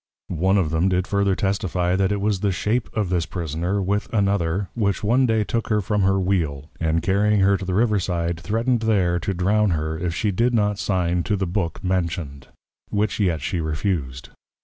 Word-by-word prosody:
One 95 Hz, +4 st, +2 dB
of 85 Hz, -6 st, +1 dB
them 80 Hz, +4 st, +2 dB
did 90 Hz, 0 st, +1 dB
further 100 Hz, -1 st, +1 dB
testifie, 95 Hz, -2 st, 0 dB
that 95 Hz, +1 st, +1 dB
it 100 Hz, -, 0 dB
was 100 Hz, -1 st, 0 dB
the 100 Hz, 0 st, +1 dB
Shape 110 Hz, +6 st, -1 dB
of 105 Hz, -4 st, 0 dB
this 90 Hz, -2 st, 0 dB
Prisoner, 85 Hz, +3 st, -2 dB
with 100 Hz, +3 st, -1 dB
another, 100 Hz, -3 st, 0 dB
which 100 Hz, -4 st, -1 dB
one 125 Hz, +5 st, +3 dB
day 110 Hz, -2 st, +2 dB
took 115 Hz, +2 st, -2 dB
her 105 Hz, -1 st, +2 dB
from 105 Hz, +1 st, 0 dB
her 95 Hz, 0 st, +3 dB
Wheel, 80 Hz, -7 st, -1 dB
and 80 Hz, 0 st, 0 dB
carrying 105 Hz, +2 st, +2 dB
her 100 Hz, +1 st, +4 dB
to 95 Hz, 0 st, -4 dB
the 90 Hz, -1 st, -2 dB
Riverside, 90 Hz, -6 st, 0 dB
threatned 115 Hz, +7 st, 0 dB
there 95 Hz, -6 st, +1 dB
to 95 Hz, +3 st, -3 dB
Drown 105 Hz, +4 st, +2 dB
her, 80 Hz, +1 st, -3 dB
if 85 Hz, -2 st, -2 dB
she 105 Hz, +3 st, 0 dB
did 120 Hz, +6 st, +1 dB
not 105 Hz, -2 st, +1 dB
Sign 90 Hz, -3 st, 0 dB
to 105 Hz, -, +1 dB
the 95 Hz, -1 st, -1 dB
Book 85 Hz, -1 st, -3 dB
mentioned: 85 Hz, -7 st, -2 dB, 0.4 s
which 105 Hz, 0 st, -1 dB
yet 85 Hz, -7 st, +1 dB
she 85 Hz, +3 st, -2 dB
refused. 75 Hz, -4 st, -3 dB
95 Hz, 195 wpm, -23 LUFS, 85-105 Hz, 0.4 s, her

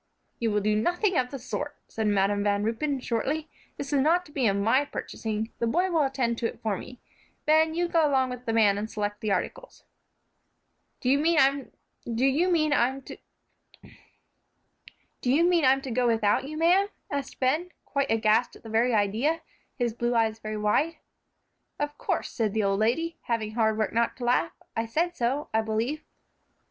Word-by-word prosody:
"You 230 Hz, -, +1 dB
will 210 Hz, -1 st, +1 dB
do 210 Hz, +1 st, +1 dB
nothing 355 Hz, -, +1 dB
of 250 Hz, -3 st, +1 dB
the 275 Hz, -, -6 dB
sort," 290 Hz, +3 st, -5 dB
said 220 Hz, -1 st, -2 dB
Madam 205 Hz, 0 st, +2 dB
Van 205 Hz, 0 st, +1 dB
Ruypen, 260 Hz, +5 st, -1 dB
shortly; 280 Hz, +7 st, -2 dB, 0.3 s
"this 280 Hz, +1 st, -5 dB
is 280 Hz, -, +3 dB
not 340 Hz, +5 st, +3 dB
to 295 Hz, -, -16 dB
be 270 Hz, -5 st, +1 dB
of 195 Hz, -, +2 dB
my 225 Hz, +7 st, +3 dB
purchasing; 220 Hz, -5 st, -4 dB
this 235 Hz, -, +1 dB
boy 360 Hz, +8 st, +1 dB
will 325 Hz, -2 st, +3 dB
attend 265 Hz, -4 st, 0 dB
to 235 Hz, -, +1 dB
it -, -, -9 dB
for 215 Hz, -3 st, 0 dB
me. 250 Hz, +6 st, -9 dB, 0.5 s
Ben, 315 Hz, +1 st, +4 dB
you 350 Hz, +1 st, +1 dB
go 330 Hz, -3 st, +3 dB
along 260 Hz, -2 st, +2 dB
with 250 Hz, 0 st, -8 dB
the -, -, +1 dB
man 210 Hz, -3 st, +3 dB
and 215 Hz, +1 st, -4 dB
select 205 Hz, -1 st, -3 dB
the 215 Hz, -, -1 dB
articles." -, -, -3 dB, 1.2 s
"Do -, -, -3 dB
you 280 Hz, -, +4 dB
mean 330 Hz, +2 st, +2 dB, 1.4 s
I'm 265 Hz, +1 st, +1 dB, 2.2 s
to 270 Hz, -2 st, +3 dB
go 250 Hz, +1 st, +2 dB
without 225 Hz, +3 st, +2 dB
you, 310 Hz, +1 st, -6 dB
ma'am?" 355 Hz, +5 st, +4 dB, 0.2 s
asked 280 Hz, -2 st, -4 dB
Ben, 300 Hz, +8 st, +1 dB, 0.2 s
quite 280 Hz, -1 st, -1 dB
aghast 220 Hz, +1 st, +2 dB
at -, -, -16 dB
the 225 Hz, -, -9 dB
very 230 Hz, +2 st, +2 dB
idea, 220 Hz, +11 st, +1 dB, 0.3 s
his 240 Hz, -3 st, -1 dB
blue 240 Hz, +1 st, -1 dB
eyes 225 Hz, -1 st, +1 dB
very 215 Hz, -1 st, -5 dB
wide. 285 Hz, +10 st, +1 dB, 0.8 s
"Of 295 Hz, 0 st, -2 dB
course," -, -, -2 dB
said 220 Hz, -3 st, -1 dB
the 220 Hz, -, +2 dB
old 195 Hz, 0 st, +1 dB
lady, 325 Hz, +10 st, 0 dB
having 225 Hz, -3 st, -1 dB
hard 220 Hz, -1 st, +1 dB
work 215 Hz, -, -1 dB
not 230 Hz, 0 st, +1 dB
to 250 Hz, -, -7 dB
laugh; 245 Hz, +1 st, +2 dB, 0.2 s
"I 225 Hz, 0 st, -1 dB
said 340 Hz, +9 st, 0 dB
so, 265 Hz, +2 st, -1 dB
I 220 Hz, -, +3 dB
believe." 225 Hz, +8 st, -2 dB
245 Hz, 175 wpm, -27 LUFS, 220-295 Hz, 2.2 s, Ben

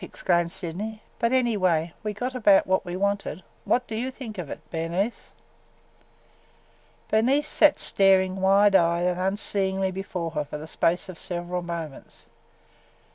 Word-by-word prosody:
exclaimed 175 Hz, -2 st, 0 dB
Sydney. 195 Hz, +5 st, -5 dB, 0.2 s
"But 235 Hz, -, +1 dB
anyway 185 Hz, -10 st, +1 dB
we 215 Hz, -, -3 dB
got 250 Hz, +4 st, -3 dB
about 205 Hz, -5 st, +5 dB
what 190 Hz, 0 st, +1 dB
we 175 Hz, -1 st, -5 dB
wanted. 200 Hz, -1 st, -2 dB, 0.2 s
What 250 Hz, 0 st, +1 dB
do 225 Hz, -, -8 dB
you 240 Hz, +4 st, -2 dB
think 235 Hz, -6 st, -8 dB
of 165 Hz, -6 st, -5 dB
it, -, -, -6 dB
Bernice?" 170 Hz, +7 st, -3 dB, 1.8 s
Bernice 265 Hz, +7 st, +3 dB
sat 300 Hz, -1 st, +4 dB
staring 190 Hz, -1 st, +3 dB
wide 195 Hz, +1 st, +5 dB
eyed 170 Hz, -1 st, +3 dB
and 180 Hz, 0 st, 0 dB
unseeingly 190 Hz, 0 st, 0 dB
before 180 Hz, -3 st, -4 dB
her 150 Hz, -2 st, -2 dB
for 145 Hz, -, -7 dB
the 150 Hz, -, -8 dB
space 165 Hz, +2 st, 0 dB
of 180 Hz, -4 st, -9 dB
several 175 Hz, 0 st, -2 dB
moments. 170 Hz, -4 st, -7 dB
190 Hz, 145 wpm, -25 LUFS, 175-215 Hz, 1.8 s, about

